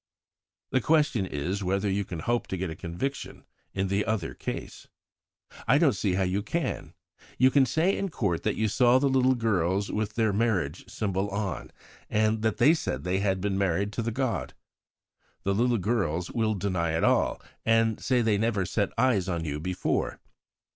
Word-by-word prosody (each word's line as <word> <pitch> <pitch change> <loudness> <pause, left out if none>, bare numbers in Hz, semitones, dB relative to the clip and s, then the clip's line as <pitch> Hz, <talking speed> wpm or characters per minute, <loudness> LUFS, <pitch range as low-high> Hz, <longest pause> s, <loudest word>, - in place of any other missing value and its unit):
"The 130 - +2
question 150 -9 +2
is 90 +6 -3
whether 95 +2 0
you 100 +1 0
can 85 -3 -6
hope 120 +6 0
to 95 - -3
get 90 -2 -3
a - - -6
conviction 90 - -5 0.3
in 95 +1 -1
the 100 +2 +1
other 110 -7 -2
case. - - -6 0.8
"I - - +5
don't - - +4
see 95 -3 0
how 95 - +1
you 95 +2 0
can. 165 +11 -3 0.4
You 130 +1 +5
can 135 -2 +4
say 160 +9 +2
in 195 - -2
court 100 - -1
that - - 0
you 110 - +1
saw 120 +3 +4
the 140 +2 +2
little 130 -1 +3
girls 100 -4 0
with 105 -1 -2
their 110 -3 +2
marriage 100 -9 -1
symbol 100 -1 -2
on, 100 0 -3 0.4
and 110 0 +1
that 110 0 0
they 155 - +6
said 70 - -3
they 90 +2 0
had 95 -2 0
been 100 -1 -1
married 100 +2 0
to - - -2
the 115 - -1
god. 130 +1 -2 0.9
The 100 - +1
little 120 +3 +2
girls 90 -5 -1
will 110 -2 0
deny 90 -5 -1
it - - -1
all, - - +2 0.2
and 115 -1 +2
say 125 -2 +2
they 105 -3 +2
never 105 -4 +1
set 100 +3 0
eyes 115 -7 +2
on 85 -2 -2
you 75 -1 -3
before. 90 +3 -2
100 Hz, 185 wpm, -27 LUFS, 95-115 Hz, 0.9 s, they